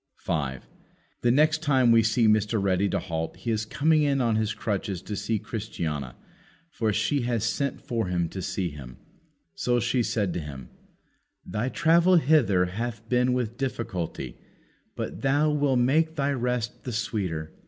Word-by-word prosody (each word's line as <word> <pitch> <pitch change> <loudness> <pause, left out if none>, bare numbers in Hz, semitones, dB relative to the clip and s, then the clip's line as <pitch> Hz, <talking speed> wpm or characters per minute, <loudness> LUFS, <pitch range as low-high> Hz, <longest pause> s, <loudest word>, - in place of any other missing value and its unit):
5. 70 -6 -3 0.6
The 120 - +2
next 155 +5 +3
time 130 -6 +4
we 115 0 +6
see 115 +1 +2
Mr. 110 +1 +2
Ready 100 0 +1
to - - 0
halt 80 -1 -4
he 115 - -3
is 110 0 -1
coming 155 +6 +2
in 140 -2 +2
on 115 -3 +2
his 110 -1 0
crutches 100 -3 -3
to 105 - -5
see 105 +2 -1
Christiana, 80 - -4 0.6
for 110 -7 0
she 140 +7 +1
has 120 -2 -1
sent 135 +4 -1
for 115 -5 -2
him 85 -2 0
to 95 - -6
see 95 -2 -2
him. 65 -4 -10 0.6
So 120 +9 +1
she 120 +2 +1
said 105 -5 0
to - - -2
him, 70 -5 -8 0.8
"Thy 110 +4 -2
travel 170 +5 +4
hither 135 - +4
hath 115 +4 -5
been 125 0 +3
with 120 -2 -2
difficulty, 95 - -4 0.6
but 95 - -5
that 140 +4 +2
will 145 -3 +2
make 155 +6 +2
thy 140 -2 0
rest 125 -3 -2
the 125 - -5
sweeter." 90 -8 -2
115 Hz, 165 wpm, -26 LUFS, 95-130 Hz, 0.8 s, we